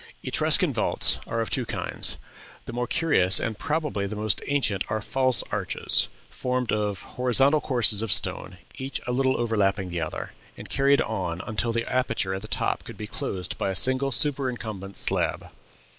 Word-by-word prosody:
"Etruscan - - +2
vaults - - +2
are 115 - -2
of 110 - -4
two - - +1
kinds. - - -4 0.5
The 120 - -8
more 125 0 -2
curious 100 - +4
and 110 -2 -4
probably 150 -10 -2
the 105 - -6
most 105 -2 0
ancient 115 -9 0
are 110 0 -1
false 130 +3 +2
arches, - - +2 0.2
formed 125 -1 -2
of 105 -3 -2
horizontal 135 +4 +2
courses 115 -5 +3
of 110 -3 -2
stone, - - +3 0.2
each 135 +1 -3
a 125 - -2
little 130 +1 +1
overlapping 100 -5 0
the 85 -1 -4
other, 80 - -5 0.3
and - - -9
carried 140 +1 +3
on 90 -6 -3
until 115 +1 -1
the 115 0 -1
aperture 115 -7 -1
at 95 - -4
the 110 - -7
top - - -1
could - - -11
be 105 - -6
closed 95 -3 -5
by - - -1
a 95 - -3
single 130 +8 +2
superincumbent 115 -7 0
slab. - - 0
115 Hz, 175 wpm, -25 LUFS, 100-130 Hz, 0.5 s, curious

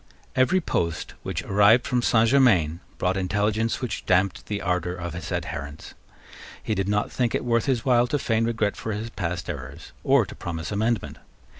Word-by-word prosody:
Every 130 +9 +3
post 85 - -2
which - - -4
arrived 105 +4 +4
from 125 -2 +1
Saint 115 -1 +3
Germains 95 - +4 0.2
brought 95 +1 0
intelligence 105 +5 0
which 125 - -3
damped 95 +1 +1
the 105 -1 -2
ardour 90 -2 -1
of 85 -2 -5
his 85 -2 -6
adherents. 75 +1 -5 0.7
He - - -1
did 95 +1 -1
not 105 0 0
think 120 -3 0
it - - -2
worth 115 -2 +2
his 125 -4 0
while 125 -2 +4
to 145 - 0
feign 115 -4 0
regret 110 -3 0
for 110 - -4
his 110 +3 -5
past 85 -4 -3
errors, 70 -5 -7
or - - +4
to - - -10
promise 80 0 -5
amendment. 110 0 -1
105 Hz, 180 wpm, -25 LUFS, 90-115 Hz, 0.7 s, arrived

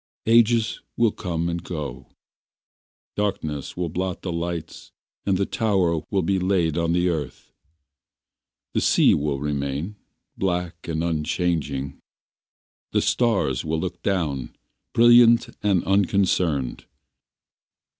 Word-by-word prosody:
Ages 115 0 +3 0.2
will 115 -2 +3
come 85 -3 -3
and 85 0 -3
go, 75 -7 -6 1.1
Darkness 80 -10 -3
will 90 -1 -1
blot 90 +2 -3
the 90 - -3
lights 85 -1 -5 0.4
And 95 -2 +3
the 100 - +1
tower 95 -8 +1
will 95 -3 0
be 95 +2 +1
laid 90 -4 +1
on 85 -1 0
the 90 +1 +2
earth. 80 -6 -4 1.2
The - - +1
sea - - +4
will 70 -1 -1
remain 70 +6 -3 0.4
Black 90 -3 -2
and 80 -1 -2
unchanging, 75 -4 -1 0.9
The - - +3
stars 105 - +1
will 80 0 -1
look 90 +1 -5
down 75 -10 -2 0.4
Brilliant 120 0 +6
and 100 -4 +2
unconcerned. 95 -8 +1
85 Hz, 115 wpm, -24 LUFS, 75-100 Hz, 1.2 s, Brilliant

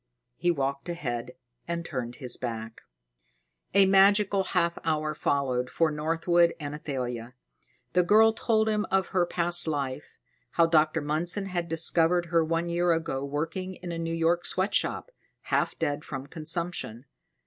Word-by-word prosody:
He 175 - 0
walked 140 -1 -1
ahead 125 -7 -4 0.3
and 170 0 -3
turned 125 -6 -4
his 125 -2 0
back. 115 -2 -6 0.9
A 200 -1 +7
magical 195 +1 +4
half 170 -2 0
hour 155 -1 0
followed 130 -4 0
for 165 -2 +1
Northwood 165 +3 +2
and 145 -1 -5
Athalia. 125 -5 -5 0.6
The 180 - +5
girl 220 +5 +5
told 220 -1 +1
him 210 -1 +1
of 190 -1 +1
her 180 -2 +1
past 175 -1 +1
life, 140 -2 -3 0.4
how 170 - +4
Dr. 160 -1 +2
Mundson 175 +7 0
had 175 -2 -3
discovered 165 +2 +2
her 165 -1 +5
one 165 +1 -1
year 175 +1 +1
ago 160 -5 -2
working 165 +6 -3
in 175 -1 -7
a 165 - -4
New 165 0 -2
York 165 +1 +1
sweat 185 +3 0
shop, - - -1 0.3
half - - -1
dead 150 -2 -2
from 135 -2 -6
consumption. 160 -5 -3
165 Hz, 150 wpm, -27 LUFS, 145-175 Hz, 0.9 s, A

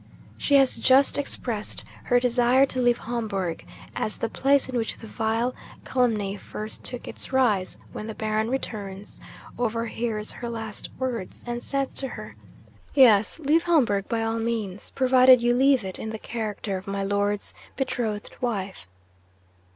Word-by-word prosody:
She 285 - +2
has 270 -2 +5
just 270 +2 +5
expressed 235 -6 -3 0.2
her 245 - +4
desire 250 +2 +4
to 255 -1 -3
leave 240 -1 +4
Homburg, 205 -7 -3 0.3
as 215 - -1
the 230 - -2
place 275 +3 +3
in 255 - -5
which 230 -2 -1
the - - -11
vile 225 +3 -1 0.3
calumny 215 -6 +1
first 215 +2 -7
took 245 - -6
its - - -6
rise, 220 -8 +2 0.2
when 215 - -6
the 220 - -6
Baron 215 +1 -1
returns, 205 -6 -5 0.4
overhears 230 -2 -2
her 240 - -6
last 220 -3 -5
words, 245 -7 -4
and 240 0 -3
says 275 0 -1
to 270 - -5
her, - - -8 0.6
"Yes, 220 -7 +6
leave 310 +3 +3
Homburg 235 - +2
by 225 -1 0
all 225 0 -1
means; 220 -4 -3
provided 255 -1 +6
you 240 +1 +2
leave 265 -1 +4
it 190 - -6
in 220 - -4
the 220 - -4
character 215 -3 -4
of 185 - -10
my 195 0 -2
Lord's 205 +1 -1 0.2
betrothed 225 -6 -2
wife!" 200 - -3
230 Hz, 155 wpm, -25 LUFS, 210-255 Hz, 0.6 s, Yes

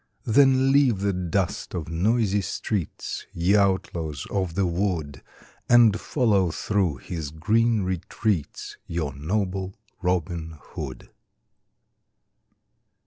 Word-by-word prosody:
Then 135 +2 +4
leave 135 -8 +4
the 100 0 +1
dust 90 +1 -2
of 85 -3 -4
noisy 100 +5 +1
streets, 100 -2 -4
Ye 90 +4 +2
outlaws 85 -7 0
of 95 -4 -1
the 100 - +2
wood, 85 -6 -2 0.5
And 115 -3 +6
follow 105 - +2
through 95 -2 0
his 80 +1 -5
green 110 +7 +1
retreats 95 -1 -2
Your 80 -5 -2
noble 95 +5 -2 0.3
Robin 85 -3 -2
Hood. - - -8
95 Hz, 100 wpm, -25 LUFS, 85-105 Hz, 0.5 s, And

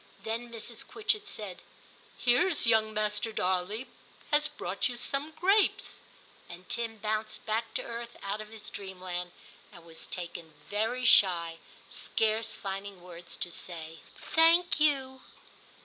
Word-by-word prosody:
Then 230 +2 -3
Mrs. 230 0 -4
Quitchett 425 -1 +1
said, 205 - -4 0.3
' - - -26
Here's 305 +7 +4
young 220 -1 +5
Master 215 +1 0
Darley 190 +4 0 0.5
has 300 0 +4
brought 200 -9 -2
you 240 - -5
some 275 +5 -2
grapes,' 395 +3 +3 0.5
and 180 +1 -10
Tim 230 -1 -1
bounced 215 +1 -2
back 225 +1 -1
to - - -1
earth 235 0 -6
out 200 +2 -2
of 215 - -10
his 220 -1 -8
dreamland, 180 -2 -5 0.4
and 170 - -14
was 165 -1 -5
taken 170 -3 -6
very 225 +5 0
shy, 170 -7 +5 0.3
scarce 220 0 +1
finding 195 0 -5
words 175 -1 -10
to 175 - -2
say 165 -2 -7 0.2
' - - -13
Thank 330 +1 +6
you. 265 -3 +2
215 Hz, 140 wpm, -30 LUFS, 185-245 Hz, 0.5 s, Thank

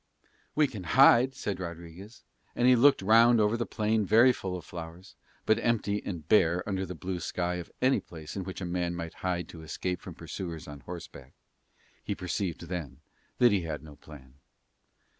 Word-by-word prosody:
"We 150 - +4
can 110 -9 -6
hide," 130 -1 +7
said 100 -7 -4
Rodriguez, 85 +5 -9 0.3
and 120 - +2
he 130 - +7
looked 135 -3 +5
round 115 +3 +6
over 105 +1 +3
the 120 0 -2
plain, 110 0 0
very 115 +6 +5
full 95 -5 -4
of 85 - -11
flowers, 85 +2 -9 0.3
but 110 +1 +3
empty 105 -3 0
and 85 -6 -6
bare 90 -2 +3
under 95 -2 -2
the 90 - -6
blue 90 +2 -4
sky 90 +1 -2
of 85 - -7
any 130 +1 +4
place 80 -3 -10
in 95 - -3
which 95 +1 -7
a - - -3
man 85 0 -2
might 85 -1 -6
hide 90 -2 -2
to 80 - -10
escape 90 +3 -4
from 90 - -9
pursuers 85 -1 -7
on 75 -1 -9
horse 85 +5 -8
back. 65 -1 -14 0.7
He 100 - -3
perceived 90 -1 -3
then 85 -7 -6 0.4
that 120 -2 +5
he 100 -2 +2
had 80 -2 -5
no 75 -2 -12
plan. 70 -3 -15
90 Hz, 190 wpm, -29 LUFS, 85-110 Hz, 0.7 s, hide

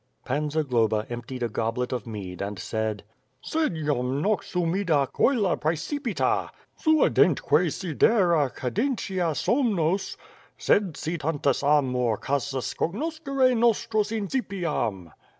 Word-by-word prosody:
Pan 150 +3 -1
Zagloba 120 -8 +1
emptied 120 +1 -5
a - - +1
goblet 115 +3 -2
of 125 -4 -3
mead 100 -5 -6
and 100 +1 -4
said: 110 -1 -3 0.4
"Sed 310 - -1
jam 140 -4 -1
nox 205 +7 -1
humida 170 -4 +1
coelo 215 -10 +2
praecipitat 165 - -1 0.3
Suadentque 180 - +3
sidera 170 - +2
cadentia 185 - -1
somnos 200 - 0 0.5
Bed 195 -7 +3
si 165 +2 -3
iantus 145 -3 0
amor 130 -6 +2
casus 140 0 -2
cognoscere 275 - 0
nostras 225 -2 +2
Incipiam 180 - -2
155 Hz, 105 wpm, -26 LUFS, 125-205 Hz, 0.5 s, Suadentque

